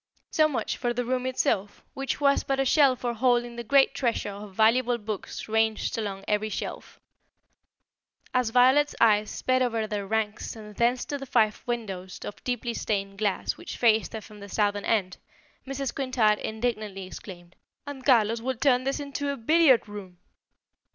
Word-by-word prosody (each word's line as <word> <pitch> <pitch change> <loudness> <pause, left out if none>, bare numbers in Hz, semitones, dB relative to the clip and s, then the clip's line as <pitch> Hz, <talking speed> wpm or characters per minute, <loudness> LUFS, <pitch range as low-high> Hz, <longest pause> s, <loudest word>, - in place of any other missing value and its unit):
So 310 -1 +4
much 295 - -2
for 240 -1 -1
the 245 +1 -1
room 255 +1 -1
itself, 205 -5 -1
which 270 +1 -3
was 280 -1 +3
but 270 0 -1
a 270 - +2
shell 275 -1 +5
for 240 -1 -3
holding 240 0 +1
the 235 - -5
great 270 +4 +4
treasure 235 -5 -1
of 200 -1 -10
valuable 235 +3 +3
books 210 -3 -6
ranged 220 0 0
along 200 -3 -4
every 210 +1 0
shelf. - - -6 1.3
As 250 -3 +2
Violet's 260 +5 +4
eyes 215 -2 +4
sped 255 0 0
over 230 -3 0
their 205 -2 -4
ranks 220 +1 -2
and 210 -2 -11
thence 240 +3 +1
to 285 - -4
the 275 - -8
five 215 -3 +2
windows 195 -6 -4
of 205 - -8
deeply 245 -1 -2
stained 195 -3 -3
glass 205 -3 -1
which - - -8
faced 225 -2 +3
her 220 - -5
from 210 0 -14
the 200 0 -10
southern 205 0 0
end, 190 -5 0 0.5
Mrs. 275 -1 -3
Quintard 245 -6 +1
indignantly 215 -4 -3
exclaimed: 180 -2 -11 0.3
"And 285 -2 -8
Carlos 230 -4 +3
would 260 0 -3
turn 255 -2 +3
this 275 +2 -1
into 285 0 -3
a 280 - -5
billiard 270 -1 +4
room!" 200 -4 -9
230 Hz, 170 wpm, -27 LUFS, 210-255 Hz, 1.3 s, shell